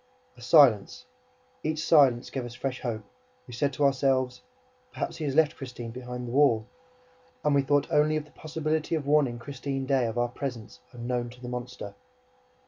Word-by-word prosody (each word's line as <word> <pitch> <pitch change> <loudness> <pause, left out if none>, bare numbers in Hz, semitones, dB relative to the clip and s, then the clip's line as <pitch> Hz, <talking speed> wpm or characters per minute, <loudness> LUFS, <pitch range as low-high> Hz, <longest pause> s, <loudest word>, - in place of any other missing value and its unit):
A - - -16
silence. 125 -6 +4 0.6
Each 155 0 -2
silence 135 -6 +4
gave 130 - -3
us 120 0 -8
fresh 130 0 -4
hope. 110 -4 -3 0.4
We 125 - -11
said 140 +4 0
to 145 - -1
ourselves: 130 -2 +1 0.5
"Perhaps - - -4
he 155 - -4
has 140 -2 -2
left 160 -1 +4
Christine 125 -3 -7
behind 125 0 -6
the - - -5
wall." 125 -5 +4 0.8
And 150 - +2
we 140 - +4
thought 145 +1 +2
only 150 +1 +3
of 155 -1 -2
the 150 - -21
possibility 155 +1 -2
of 150 -3 -3
warning 140 -4 +2
Christine 135 +2 -4
Daae 130 -3 +2
of 115 - -6
our 120 0 +1
presence, 120 -3 -6
unknown 120 0 -3
to 125 +1 -14
the 125 -1 -7
monster. 125 -4 -6
130 Hz, 180 wpm, -28 LUFS, 120-145 Hz, 0.8 s, silence